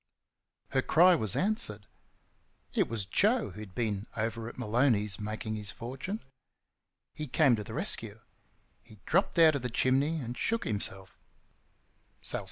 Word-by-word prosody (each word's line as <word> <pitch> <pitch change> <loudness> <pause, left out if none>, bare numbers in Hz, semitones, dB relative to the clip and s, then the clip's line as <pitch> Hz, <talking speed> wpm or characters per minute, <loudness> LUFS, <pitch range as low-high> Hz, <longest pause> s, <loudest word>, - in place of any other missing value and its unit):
Her 130 - +1
cry 175 +7 +5
was 110 - +2
answered. 145 - +1 0.9
It - - +2
was 110 -4 -3
Joe, 215 - +2
who - - -11
had 100 -4 -10
been 105 -3 -2
over 115 +1 -2
at - - -13
Maloney's 115 -4 +1
making 110 +1 -4
his 105 -1 -3
fortune. 135 - -6 0.9
He 150 - -5
came 135 -1 +4
to 105 - -5
the - - -8
rescue. - - 0 0.6
He 110 +1 -17
dropped 185 +1 +1
out 160 -2 +7
of 140 - -2
the 125 - -3
chimney 135 +6 +2
and 120 -5 -5
shook 230 - -1
himself. 100 -2 -4
120 Hz, 145 wpm, -30 LUFS, 105-155 Hz, 0.9 s, out